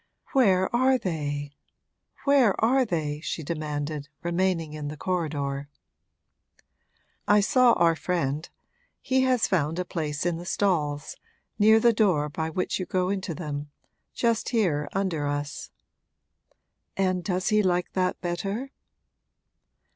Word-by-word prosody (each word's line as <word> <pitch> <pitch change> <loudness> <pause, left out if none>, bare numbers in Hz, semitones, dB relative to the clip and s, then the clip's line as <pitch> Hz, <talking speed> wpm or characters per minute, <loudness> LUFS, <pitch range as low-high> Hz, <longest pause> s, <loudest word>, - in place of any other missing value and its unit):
'Where 195 -6 +3
are 260 +2 +4
they 145 - -3 0.7
where 275 -7 +4
are 255 +4 +3
they?' 155 -7 -2
she 160 0 -4
demanded, 150 -1 -4
remaining 170 -2 0
in 150 -1 -5
the 150 +1 -6
corridor. 145 -5 -2 1.6
'I 210 0 +6
saw 245 +4 +5
our 165 -1 +3
friend 155 -3 -2 0.5
he 260 0 +1
has 255 -3 +2
found 165 -3 0
a 180 - -1
place 155 -3 -3
in 175 -1 0
the 175 - -8
stalls, 150 -8 -1 0.4
near 220 +2 +6
the 235 +1 +4
door 180 -9 +2
by 160 +2 -3
which 180 +4 -2
you 185 - -4
go 185 0 0
into 190 -4 -2
them 145 -3 -5 0.4
just 230 -2 0
here 165 - +1
under 180 -7 -1
us.' 145 0 -4 1.3
'And 185 -2 +1
does 185 -1 -1
he 215 -1 +4
like 180 -2 0
that 185 -1 0
better?' 195 +9 -3
175 Hz, 130 wpm, -26 LUFS, 150-205 Hz, 1.6 s, I